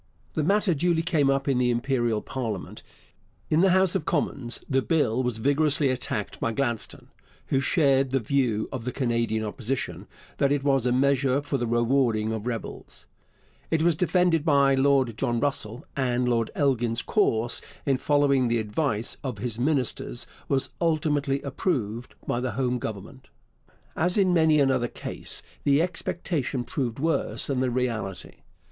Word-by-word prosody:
The 155 - 0
matter 200 +2 +2
duly 165 +2 +1
came 155 -5 +2
up 135 0 0
in 135 -3 +2
the 125 -1 +2
Imperial 120 -3 0
parliament. 115 -8 -5 0.7
In 155 +2 +4
the 190 - +5
House 190 0 +3
of 190 -5 -1
Commons 140 -7 -2
the 135 -1 +2
Bill 130 -6 +1
was 125 -3 -2
vigorously 145 +3 +2
attacked 125 -4 -3
by 115 - 0
Gladstone, 120 -3 -3 0.4
who 135 - +2
shared 135 -2 +2
the 135 +1 +1
view 120 -3 0
of 130 -4 -5
the 125 - -3
Canadian 115 -4 -1
Opposition 115 +5 -4 0.3
that 140 0 +2
it 145 -1 +1
was 135 -3 +2
a - - +2
measure 135 +1 +2
for 145 -1 -2
the 120 - -1
rewarding 120 -2 +1
of 110 +1 -4
rebels. 115 -2 -6 0.6
It 160 -1 +1
was 170 -1 +3
defended 180 -2 +2
by 140 -3 +4
Lord 135 -3 +2
John 120 -3 0
Russell, 120 -4 -2
and 125 -2 0
Lord 115 -2 +1
Elgin's 120 -5 +1
course 120 - +1 0.2
in 135 -2 +2
following 140 -2 +2
the 120 0 +1
advice 110 +1 -1
of 130 -6 -4
his 115 +2 -4
ministers 130 - 0 0.2
was 135 -1 0
ultimately 150 -4 +1
approved 125 - -2
by 120 - -1
the 125 -2 -2
home 125 0 0
government. 115 +5 -7 0.7
As 175 +4 +1
in 190 -3 +3
many 160 -3 +4
another 135 -3 +2
case, - - -5 0.2
the 140 +1 +4
expectation 170 -6 -2
proved 120 -3 -3
worse 160 +4 +1
than 135 -3 0
the 130 0 +1
reality. 115 -6 -3
135 Hz, 160 wpm, -26 LUFS, 120-145 Hz, 0.7 s, the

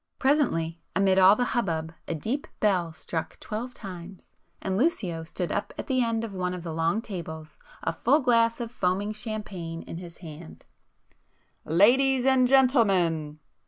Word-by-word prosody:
Presently, 205 - +1 0.2
amid 190 0 +4
all 190 +2 +8
the 245 - 0
hubbub, 160 -9 -1
a 165 - -2
deep 240 - -2
bell 185 -5 +2
struck 160 +1 -5
twelve 235 +4 -5
times, 185 -2 -10 0.3
and 190 - -2
Lucio 190 - 0
stood 175 +2 -4
up - - -3
at - - -4
the 255 -2 +1
end 230 -1 -1
of 220 -3 -5
one 180 -1 -2
of 175 - -7
the 165 -2 -5
long 165 +7 0
tables, 160 -5 -7 0.2
a - - 0
full 280 +6 +3
glass 230 -3 +3
of 235 -1 -4
foaming 200 -1 -1
champagne 205 -7 -5
in - - -7
his 170 -1 -10
hand— 160 -1 -11 1.0
"Ladies 250 - +4
and 260 -1 +4
gentlemen!" 195 - +3
195 Hz, 160 wpm, -27 LUFS, 165-235 Hz, 1.0 s, all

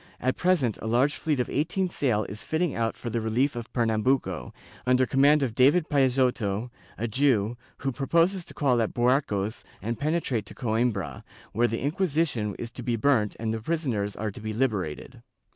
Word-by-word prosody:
At 130 +1 0
present 170 - +1
a - - -4
large 125 +6 +3
fleet 150 -4 -1
of 125 - 0
eighteen 185 +6 0
sail 125 -11 0
is 105 +2 -8
fitting 160 -1 0
out 115 -1 -1
for 120 - -5
the 115 - -1
relief 120 +6 +1
of 120 -1 -6
Pernambuco, 115 - 0 0.4
under 125 0 +4
command 140 +3 +4
of 120 -5 -1
David 145 +7 +4
Peixoto, 125 -5 +1 0.3
a 115 - -2
Jew, 115 -3 +2 0.2
who 135 - -2
proposes 170 +8 +1
to - - -10
call 125 -5 +2
at 110 - -2
Buarcos 120 -4 +1 0.2
and 115 +3 -4
penetrate 145 - -1
to - - -11
Coimbra, 110 - -1 0.3
where 120 +2 +2
the 115 0 -3
Inquisition 150 - 0
is 115 - -6
to 125 - -8
be 120 0 -1
burnt 115 -3 +2
and 110 -1 -1
the 110 - -3
prisoners 115 -9 -1
are 105 -1 -3
to 110 - -11
be 110 0 -4
liberated. 105 - -2
120 Hz, 180 wpm, -27 LUFS, 110-140 Hz, 0.4 s, under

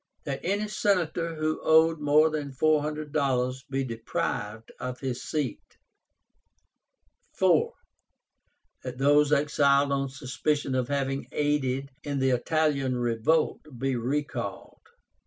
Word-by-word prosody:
That 140 -1 -3
any 205 +3 0
Senator 170 -5 0
who 155 0 -1
owed 160 0 +4
more 150 +2 +4
than 145 -3 -4
four 155 +3 +3
hundred 150 0 -5
dollars 130 -1 0
be 135 0 -1
deprived 115 -2 -4
of 125 0 -5
his 130 -2 -3
seat. 150 -5 -4 1.6
4. - - +3 1.1
That 125 -1 -6
those 145 +2 +4
exiled 140 -1 +3
on 135 -1 0
suspicion 135 +1 -2
of 130 -2 0
having 135 0 -2
aided 140 -2 0
in 145 -1 -3
the 135 -1 +2
Italian 140 0 +1
revolt 120 +7 +1 0.2
be 135 +1 -1
recalled. 120 -4 -3
140 Hz, 120 wpm, -27 LUFS, 130-150 Hz, 1.6 s, owed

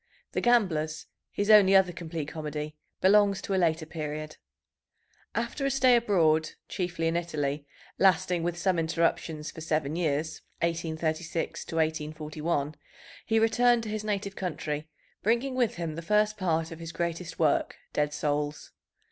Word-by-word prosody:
The - - -1
Gamblers, 175 -11 +2 0.2
his 205 +2 +1
only 195 -2 +8
other 190 -2 +5
complete 165 -3 -5
comedy, 150 -1 -5 0.3
belongs 200 +1 +5
to 195 - -2
a 190 - +2
later 160 -1 +1
period. 155 -1 -5 1.0
After 275 - -2
a 275 - +2
stay 260 -2 +5
abroad, 165 -9 +3 0.2
chiefly 175 -3 -2
in 165 - 0
Italy, 145 -4 -2 0.3
lasting 185 -2 +3
with 175 +1 -2
some 180 -1 +1
interruptions 160 -1 0
for 160 - -10
seven 155 -2 -1
years 160 -2 -1 0.2
(1836 165 0 -2
1841), 155 -1 -1 0.5
he 225 - +2
returned 240 +1 +4
to 220 - -5
his 215 0 -3
native 200 -2 -2
country, 155 -4 -3 0.3
bringing 235 +5 +1
with 245 -4 +1
him 170 -2 -3
the 165 - -5
first 210 +4 +2
part 165 -4 0
of 165 - -8
his 165 -1 -6
greatest 170 0 -3
work, 155 -3 +2 0.2
Dead 150 0 +1
Souls. 150 0 -2
165 Hz, 145 wpm, -28 LUFS, 155-195 Hz, 1.0 s, only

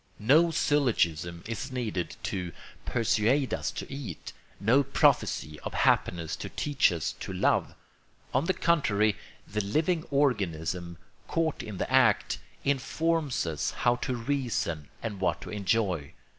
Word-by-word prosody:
No 150 +10 +5
syllogism 90 - +1
is 115 +5 -4
needed 110 -9 -3
to 90 -3 -3 0.3
persuade 120 +4 +2
us - - -1
to - - -6
eat, 130 - -7 0.3
no 115 +8 +4
prophecy 75 - +2
of - - -6
happiness 85 -3 +2
to - - -6
teach 145 -8 +2
us 85 -1 -2
to - - -5
love. 90 - +1 0.6
On 130 +5 +2
the 190 - +2
contrary, 110 -11 +2 0.3
the 105 +1 -2
living 155 - +1
organism, 90 - 0 0.3
caught 160 -2 0
in 105 -3 -7
the 115 - -3
act, 125 -6 +4 0.3
informs 140 - 0
us 80 -4 -1
how 120 0 +1
to 130 +1 -2
reason 115 - -2 0.2
and 105 -4 -4
what 85 -2 +1
to - - -8
enjoy. 100 -7 0
115 Hz, 135 wpm, -29 LUFS, 90-140 Hz, 0.6 s, No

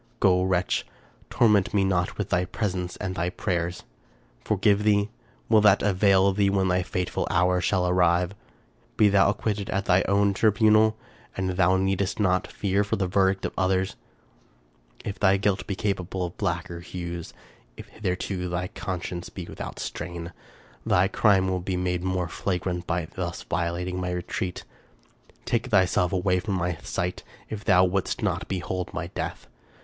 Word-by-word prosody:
Go, 90 -1 +4
wretch! 95 -1 +1 0.5
torment 105 -4 +3
me 100 - +4
not 90 -2 0
with 105 -2 -3
thy 90 -1 +2
presence 90 -3 -3
and 95 - -4
thy 85 0 -1
prayers. 90 -2 -2 0.3
— - - -34
Forgive 105 0 +2
thee? 105 0 +2 0.4
Will 110 -2 +5
that 105 -1 +5
avail 100 -1 +4
thee 100 0 +2
when 95 -1 +1
thy 90 0 +2
fateful 90 0 -2
hour 90 +1 +2
shall 90 -1 +1
arrive? 90 0 +2 0.6
Be 105 - +6
thou 100 0 +4
acquitted 105 0 -2
at 100 +1 -1
thy 90 +1 +4
own 100 0 +3
tribunal, 110 +1 +4 0.4
and 95 -1 -1
thou 95 0 +3
needest 95 +1 0
not 95 -3 +2
fear 100 0 0
the 100 -1 -1
verdict 95 +1 +1
of - - -3
others. 95 +1 0 1.1
If 100 - -5
thy 100 -1 +4
guilt 100 -1 0
be 100 - -2
capable 95 -2 -2
of 85 - -8
blacker 85 0 -2
hues, 85 -1 -6 0.4
if - - -10
hitherto 90 -2 -3
thy 90 +1 -2
con 95 -4 -5
science 85 -1 -5
be 90 - -7
without - - -7
stain, 85 -1 -6 0.5
thy 95 +2 +3
crime 100 -3 +3
will 95 0 0
be 90 0 -2
made 90 -1 -1
more 95 -1 -1
flagrant 90 0 -3
by 85 0 -1
thus 85 +1 -5
violating 90 +1 -2
my 90 - -2
retreat. 90 0 -3 0.8
Take 120 +1 0
thyself 95 -5 +3
away 90 0 +1
from 100 +1 -2
my 90 -2 -2
sight 90 -1 -3 0.3
if 105 -1 -5
thou 90 -4 +5
wouldst 95 +1 -1
not - - -1
behold 90 0 -3
my - - -2
death! - - -4
95 Hz, 165 wpm, -26 LUFS, 90-100 Hz, 1.1 s, Be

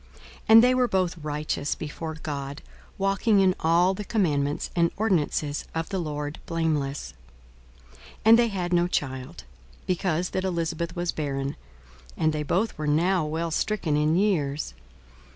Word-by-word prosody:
42:001:006 - - -21 0.3
And 225 +1 +9
they 250 +1 +5
were 255 -1 +3
both 185 -4 0
righteous 150 -1 -2
before 160 +1 -6
God, 145 -2 -6 0.3
walking 195 +2 +2
in 190 -1 +4
all 170 +3 +3
the 210 - -5
commandments 150 -10 0
and 170 -1 +3
ordinances 155 -8 0
of 165 0 -2
the 195 - -2
Lord 150 -2 -4
blameless. 150 - -1 0.8
42:001:007 65 - -22 0.3
And 225 +1 +8
they 235 - +4
had 180 -4 -2
no 175 0 +3
child, 130 - -3 0.4
because 180 -1 -1
that 185 - -1
Elisabeth 170 -2 -2
was 175 0 -1
barren, 140 -2 -3 0.6
and 155 -1 +2
they 150 - -2
both 190 +9 0
were 155 - -2
now 170 +4 +2
well 165 +2 -2
stricken 165 -4 0
in 150 +2 +2
years. 155 - 0
165 Hz, 150 wpm, -26 LUFS, 150-185 Hz, 0.8 s, And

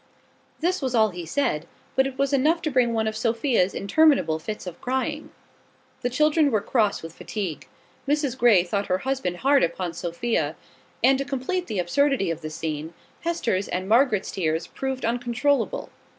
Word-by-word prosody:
This 355 +2 +1
was 260 -2 -1
all 220 -1 +4
he 175 -3 -7
said, 160 - -1 0.3
but 265 0 +3
it 265 -1 -7
was 275 0 0
enough 310 +5 +2
to 310 - -1
bring 255 -2 +3
on 235 - -2
one 220 -1 +1
of 215 - -2
Sophia's 230 -4 +1
interminable 235 - +3
fits 210 +6 -6
of 180 -2 -8
crying. 265 +4 -2 0.7
The 245 - 0
children 300 +3 +3
were 220 -5 +2
cross 210 -2 0
with 165 0 -8
fatigue: 190 -6 -5 0.4
Mrs 290 -3 +1
Grey 230 -8 +5
thought 200 +3 -2
her 185 - +1
husband 265 -10 -1
hard 280 0 +5
upon 170 +1 -1
Sophia; 175 +8 -2 0.5
and, 270 0 +5
to - - 0
complete 285 +7 -2
the 215 - -3
absurdity 195 +2 +1
of 165 0 -5
the 155 - -5
scene, 155 +1 -5 0.2
Hester's 235 - -1
and 185 +1 -3
Margaret's 225 -2 +3
tears 165 -2 -1
proved 265 -2 -4
uncontrollable. 245 - 0
235 Hz, 175 wpm, -25 LUFS, 185-275 Hz, 0.7 s, Grey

